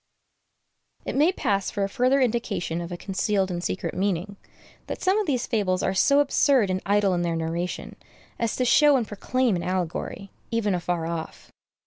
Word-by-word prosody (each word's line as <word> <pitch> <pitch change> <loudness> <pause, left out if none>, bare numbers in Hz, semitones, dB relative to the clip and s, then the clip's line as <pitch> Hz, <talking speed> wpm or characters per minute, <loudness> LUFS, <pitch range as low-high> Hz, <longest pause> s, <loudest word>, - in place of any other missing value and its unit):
It - - -3
may 305 +6 +4
pass 200 - -1
for 200 - -2
a - - +1
further 255 +5 +2
indication 215 -8 -1
of 170 +1 -7
a 175 - -4
concealed 195 0 -1
and 175 0 -4
secret 185 - -3
meaning, 195 +1 -1 0.5
that - - -5
some 380 +3 +3
of 420 - -2
these 255 -5 0
fables 195 -6 0
are 190 - +1
so 280 +9 +4
absurd 270 -7 +3
and 185 0 -1
idle 200 -1 +3
in 175 - 0
their 170 -1 -1
narration, 165 +2 -3 0.4
as 230 -2 -1
to 255 - 0
show 290 +3 +5
and 235 -4 -2
proclaim 245 +2 0
an 175 - -2
allegory, 185 +2 -3 0.2
even 230 -4 0
afar 175 -2 -1
off. 165 -1 -6
200 Hz, 180 wpm, -25 LUFS, 180-245 Hz, 0.5 s, show